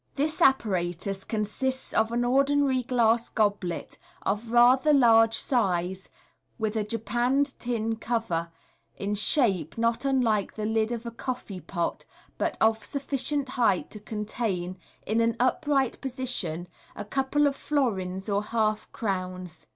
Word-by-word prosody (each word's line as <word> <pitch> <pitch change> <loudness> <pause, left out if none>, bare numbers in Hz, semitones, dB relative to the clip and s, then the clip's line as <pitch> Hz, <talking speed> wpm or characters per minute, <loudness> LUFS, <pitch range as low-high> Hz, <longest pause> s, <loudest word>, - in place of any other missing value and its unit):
— - - -41
This 310 +4 -1
apparatus 195 - +1
consists 245 +5 -2
of 220 +1 +2
aD 240 +1 0
ordinary 275 +1 +2
glass 235 -2 +2
goblet, 205 -5 -1 0.2
of 215 +3 -2
rather 255 +5 +5
large 225 -4 +5
size, 190 -6 0 0.5
with 220 -2 -2
a 215 - +1
japanned 240 +6 0
tin 225 -2 -2
cover, 215 -8 -2 0.5
in 200 +1 -2
shape 200 - +3
not 230 +2 +1
unlike 245 -7 +1
the 215 - -3
lid 220 +1 0
of 240 0 -4
a 235 - -4
coffee 235 -5 -5
pot, 170 -2 -3 0.3
but - - -1
of 220 0 +2
sufficient 280 0 -1
height 235 -8 +1
to 210 - -6
contain, 210 -4 -3 0.3
in 225 +2 +1
an 230 0 +1
upright 270 +1 +1
position, 245 - -2 0.3
a 205 - -6
couple 270 +5 +1
of 280 -1 +1
florins 195 -11 -1
or 200 -1 +1
half 215 0 -1
crowns. 185 -5 -4
225 Hz, 135 wpm, -27 LUFS, 200-255 Hz, 0.5 s, rather